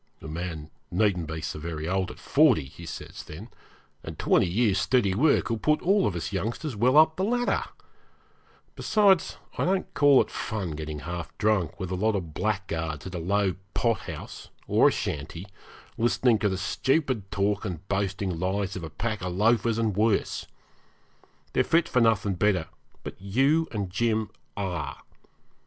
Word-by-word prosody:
'A - - -9
man 80 -1 -5 0.2
needn't 90 -4 +1
be 80 0 -5
so 75 0 -4
very 80 -1 -4
old 95 0 0
at - - -10
forty,' 135 - +3
he 80 +5 -11
says - - -7
then, 95 +10 -9 0.5
'and - - -7
twenty - - +3
years' 100 +1 +2
steady 100 +1 +2
work 135 +3 +3
will 115 - -1
put 150 +5 +2
all 195 +2 +3
of 95 - -2
us 85 +3 -4
youngsters 115 - -3
well 125 +7 +3
up 155 0 +6
the 185 - 0
ladder. 245 +4 +1 1.1
Besides, 200 -5 +3 0.2
I - - +2
don't 185 +1 0
call 145 -2 +6
it - - -15
fun 105 -7 -3
getting 75 -1 -5
half 85 0 -6
drunk 105 -7 +1
with 95 -1 -4
a - - 0
lot 110 +3 +1
of 85 -6 -4
blackguards 85 -7 -2
at 95 - -7
a 90 - -3
low 95 +2 +1 0.2
pothouse 115 -2 -3 0.2
or - - +4
a - - +4
shanty, 80 +5 -4 0.5
listening 120 0 +3
to 105 - +2
the 95 - -2
stupid 130 - 0
talk 100 +1 0
and 95 -3 -5
boasting 95 -2 -1
lies 95 +2 -1
of 90 - -5
a 80 - -5
pack 105 +7 -3
of 90 0 -3
loafers 115 +2 +3
and 110 -4 0
worse. 105 0 +1 1.1
They're - - +3
fit 170 0 +2
for 125 - +2
nothing 110 -3 +3
better; 90 -2 +1 0.3
but - - -8
you 135 +11 +2
and 100 -5 -4
Jim 110 +1 0 0.3
are. 90 -6 -4
100 Hz, 170 wpm, -27 LUFS, 90-115 Hz, 1.1 s, up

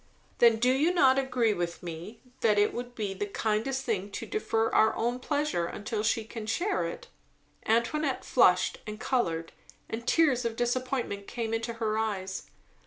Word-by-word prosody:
"Then 235 -1 +7
do 245 +3 +3
you 295 +6 +3
not 270 -7 +5
agree 250 -5 +1
with 175 -2 -4
me, 175 +6 -7 0.2
that 215 -2 +3
it 205 0 +3
would 245 0 -6
be 205 -3 -2
the 205 +2 -3
kindest 225 +6 -1
thing 205 -4 -1
to - - -4
defer 225 - 0
our 220 - +4
own 240 +2 -1
pleasure 290 - -1
until 210 +3 -3
she 220 +1 +1
can 225 -1 -7
share 370 - 0
it?" - - -7 0.6
Antoinette 250 +5 +1
flushed 180 -7 +4
and 210 0 -6
coloured, 165 -12 -1 0.4
and 230 +2 -6
tears 285 -7 +3
of 230 -1 -2
disappointment 245 -4 -2
came 225 -2 -3
into 230 +1 -2
her 220 -1 -1
eyes. 190 -4 -3
230 Hz, 170 wpm, -29 LUFS, 210-255 Hz, 0.6 s, Then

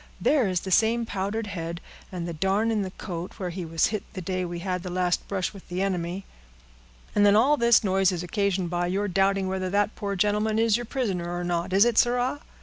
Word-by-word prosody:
There 280 -8 +3
is 185 -2 0
the 190 - -6
same 230 +4 +3
powdered 205 +2 -3
head, 170 -4 -5 0.3
and 175 -2 -4
the 170 - -4
darn 195 +7 +1
in 215 -2 +1
the 190 - -3
coat, 180 -2 -6
where 185 -4 -4
he 180 +1 -5
was 165 0 +1
hit 215 - -1
the 195 - -5
day 185 +1 -2
we 175 -1 -4
had 180 +1 -3
the 180 - -6
last 180 0 0
brush 190 0 -2
with 195 - -14
the 180 +2 -1
enemy." 185 0 -2 0.9
"And 205 - +3
then 205 0 +6
all 260 +7 +5
this 235 -4 +4
noise 190 -1 +3
is 175 -1 -3
occasioned 190 -2 -1
by 175 0 0
your 195 +3 -1
doubting 195 0 +1
whether 185 0 -2
that 205 +3 +1
poor 200 -2 -3
gentleman 210 +3 +1
is 225 -1 +3
your 240 0 -3
prisoner, 190 -11 -2
or 175 0 -3
not, 175 +1 -2
is 195 +4 +5
it, 240 -2 +3
sirrah? 245 +3 +1
195 Hz, 230 wpm, -26 LUFS, 180-210 Hz, 0.9 s, then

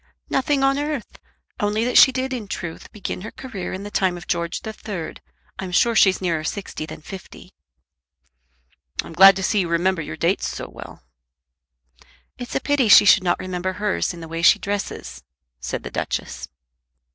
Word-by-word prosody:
"Nothing 270 +1 +1
on 275 +1 +3
earth, 295 -4 -4 0.4
only 210 +2 0
that 250 - -1
she 265 - +9
did 260 +1 -2
in 230 -5 -5
truth 170 -4 -6
begin 200 -3 -5
her 215 - -6
career 225 -9 -7
in 190 +1 -5
the 205 - -7
time 185 -3 +1
of 175 - -10
George 170 0 -2
the 220 - -6
Third. 200 -7 -7 0.4
I'm 190 -1 -5
sure 230 +6 +3
she's 190 -3 +5
nearer 165 -4 -1
sixty 155 -2 -5
than 155 -1 -10
fifty." 190 +2 -11 1.5
"I'm - - -10
glad 195 +3 +8
to 190 - -4
see 205 +2 +2
you 180 - 0
remember 170 +1 +1
your 80 - -7
dates - - 0
so - - -5
well." - - -12 1.4
"It's 245 - -6
a - - +2
pity 285 -4 +1
she 210 - +9
should 200 -1 +6
not 175 -1 +1
remember 185 0 -3
hers 205 0 -1
in 170 -2 -10
the 165 - -8
way 165 +1 -4
she 170 - +7
dresses," 195 - -5 0.4
said - - -4
the - - -7
Duchess. - - -4
195 Hz, 180 wpm, -22 LUFS, 175-220 Hz, 1.5 s, she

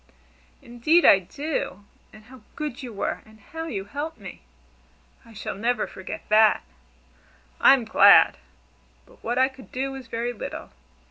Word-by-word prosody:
"Indeed 240 +9 +2
I 195 - +7
do! 205 - -5 0.3
And 215 0 -16
how 250 +2 -16
good 295 -3 -5
you 250 -3 -7
were, 200 - -4
and 220 0 -20
how 325 +10 -8
you 195 -10 -5
helped 290 +8 -6
me! 195 -4 -11 0.8
I 230 - -17
shall 210 - -6
never 230 +2 -1
forget 190 - -9
that." 215 0 +4 1.0
"I'm 265 -4 +5
glad! 220 - +6 0.7
But - - -23
what 240 +2 -2
I 260 0 +4
could 265 -1 -15
do 270 +1 -3
was 265 -2 -9
very 230 +1 -3
little. 225 - -8
240 Hz, 150 wpm, -24 LUFS, 215-270 Hz, 1.0 s, I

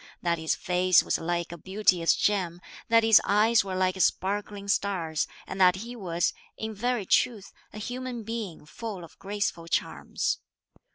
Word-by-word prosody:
That 170 -1 +1
his 160 0 0
face 180 -1 +3
was - - 0
like 170 0 -2
a 170 - -8
beauteous 185 -2 +2
gem; 180 -4 0 0.3
that 230 0 +5
his 225 -2 +7
eyes 220 +3 +4
were 190 -1 -4
like 185 0 +1
sparkling 200 +2 0
stars; 180 -6 0 0.2
and 190 - -4
that 180 0 +6
he 235 +5 -7
was, 175 -5 -1 0.2
in 220 0 -4
very 235 0 -1
truth, 210 0 +1 0.2
a - - -10
human 245 +2 -5
being 215 -8 -5
full 205 +2 -7
of 165 - -14
graceful 200 -4 -3
charms. - - -1
195 Hz, 160 wpm, -27 LUFS, 175-220 Hz, 0.3 s, his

